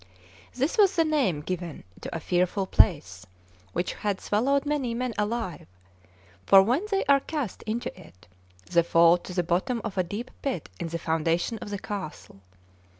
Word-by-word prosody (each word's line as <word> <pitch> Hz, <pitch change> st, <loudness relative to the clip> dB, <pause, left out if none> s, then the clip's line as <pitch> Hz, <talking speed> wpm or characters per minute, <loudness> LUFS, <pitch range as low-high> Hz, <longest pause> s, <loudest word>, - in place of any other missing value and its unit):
This 275 Hz, -, 0 dB
was 395 Hz, -2 st, +5 dB
the 330 Hz, -2 st, +3 dB
name 265 Hz, -, +1 dB
given 175 Hz, 0 st, -5 dB, 0.2 s
to -, -, -6 dB
a -, -, -2 dB
fearful 180 Hz, +4 st, 0 dB
place 125 Hz, -, +2 dB, 0.4 s
which 175 Hz, -, -2 dB
had 205 Hz, -2 st, -2 dB
swallowed 270 Hz, +7 st, +1 dB
many 280 Hz, -5 st, -1 dB
men 250 Hz, 0 st, -2 dB
alive; 210 Hz, -, -3 dB, 0.8 s
for 195 Hz, -1 st, +8 dB
when 250 Hz, -, +1 dB
they 390 Hz, -2 st, 0 dB
are 280 Hz, -1 st, +5 dB
cast 280 Hz, -, -4 dB
into 230 Hz, +3 st, -3 dB
it, 125 Hz, -, -17 dB, 0.4 s
the 170 Hz, -, +3 dB
fall 170 Hz, +1 st, +5 dB
to 180 Hz, -, -10 dB
the 180 Hz, -1 st, 0 dB
bottom 180 Hz, +8 st, 0 dB
of 205 Hz, -4 st, -3 dB
a -, -, +3 dB
deep 205 Hz, +8 st, -6 dB
pit 260 Hz, -, -3 dB
in -, -, -3 dB
the 165 Hz, +1 st, -3 dB
foundation 165 Hz, +6 st, 0 dB
of -, -, -7 dB
the 205 Hz, -, -3 dB
castle. 190 Hz, -, -7 dB
195 Hz, 170 wpm, -27 LUFS, 170-250 Hz, 0.8 s, for